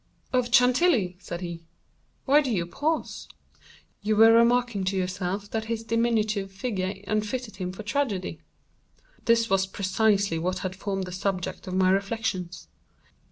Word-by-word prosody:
"—— - - -36
of 250 -1 +1
Chantilly," 250 - +4
said 175 -2 -6
he, 170 -2 -6 0.6
"why 290 +2 +5
do 275 - -3
you 185 -7 0
pause? 295 - -2 0.7
You 215 +1 +1
were 225 +1 +7
remarking 235 -2 +3
to 190 +1 0
yourself 185 +2 -3
that 220 -1 -2
his 225 0 -3
diminutive 220 -3 0
figure 195 -2 -3
unfitted 215 +1 -2
him 180 -2 -3
for 190 +4 -8
tragedy." 205 - -2 0.8
This 230 0 +3
was 195 -2 +2
precisely 200 -2 +1
what 185 +3 -1
had 185 0 -3
formed 195 -1 -3
the 180 - -6
subject 185 0 -3
of 185 - -3
my 185 0 +4
reflections. 195 -4 -2
200 Hz, 150 wpm, -26 LUFS, 185-230 Hz, 0.8 s, were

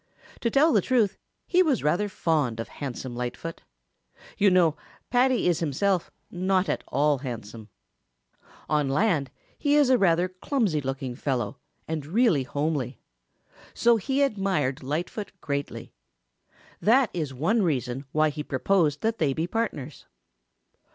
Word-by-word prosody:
To 235 - 0
tell 285 +6 +4
the 210 - +4
truth, 225 -3 +2 0.3
he 365 0 +3
was 300 -9 +2
rather 175 +8 +1
fond 150 - 0
of 115 - -5
handsome 130 -3 -6
Lightfoot. 125 +7 -5 0.7
You 200 - +4
know 175 -4 +4 0.4
Paddy 255 0 +3
is 175 -3 +2
himself 170 +4 0 0.2
not 185 +1 +1
at - - -1
all 145 +1 +2
handsome. 115 -4 -7 1.0
On 150 -2 +1
land 150 -3 +1 0.3
he 290 0 +2
is 290 -3 +4
a 255 - +5
rather 175 -1 +3
clumsy 185 - -1
looking 135 -1 -4
fellow 130 0 -2 0.3
and 160 -2 -3
really 185 - +2
homely. 140 -2 -2 0.8
So 235 0 +4
he 270 +6 0
admired 195 - 0
Lightfoot 170 +9 -4
greatly. 140 -2 -4 0.9
That 245 +2 +4
is 155 -6 -2
one 165 - +1
reason 135 - -1
why 155 0 +2
he 150 +1 -5
proposed 150 +2 +1
that 225 +1 -1
they 145 -4 +2
be 160 +4 -1
partners. 175 - -4
165 Hz, 135 wpm, -26 LUFS, 140-210 Hz, 1.0 s, a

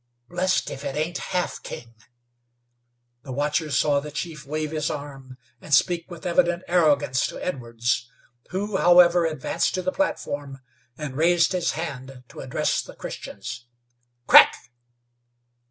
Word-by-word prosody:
Blest 185 +2 0
if 135 - -7
it 135 - -4
ain't 155 +4 -2
Half 180 -1 -3
King!" 115 -1 -9 1.3
The 130 - -9
watchers 150 +3 0
saw 145 -1 +3
the 150 +1 -7
chief 150 -1 -6
wave 155 +1 -3
his 155 -2 -1
arm 135 -3 -7 0.2
and 145 - +2
speak 170 +3 +1
with 170 -2 -10
evident 175 0 +2
arrogance 145 -7 +2
to - - -8
Edwards, 120 -5 -2 0.4
who, 195 +2 -2
however, 175 -1 +6
advanced 160 +3 -1
to 185 - -2
the 185 - 0
platform 145 - -3 0.4
and 150 -4 -6
raised 170 +2 +3
his 180 -2 0
hand 135 -5 -6
to - - -12
address - - -1
the - - -12
Christians. 120 +4 -8 0.6
"Crack!" - - +8
155 Hz, 140 wpm, -24 LUFS, 135-175 Hz, 1.3 s, Crack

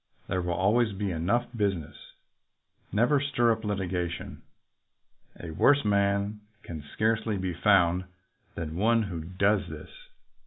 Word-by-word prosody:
There 90 - -1
will 90 -1 -2
always 105 +5 +2
be 100 0 -2
enough 90 +9 0
business. 95 -8 -1 1.0
Never 120 +8 +3
stir 125 -4 +2
up 110 0 -2
litigation. 95 -4 -3 1.0
A 85 - -7
worse 140 - +4
man 100 0 +1 0.2
can 80 -3 -7
scarcely 110 -1 0
be 95 -1 -2
found 90 0 +3 0.5
than 80 -1 -5
one 115 +3 +3
who 90 -5 -5
does 100 +4 +1
this. - - -9
100 Hz, 125 wpm, -28 LUFS, 90-110 Hz, 1.0 s, worse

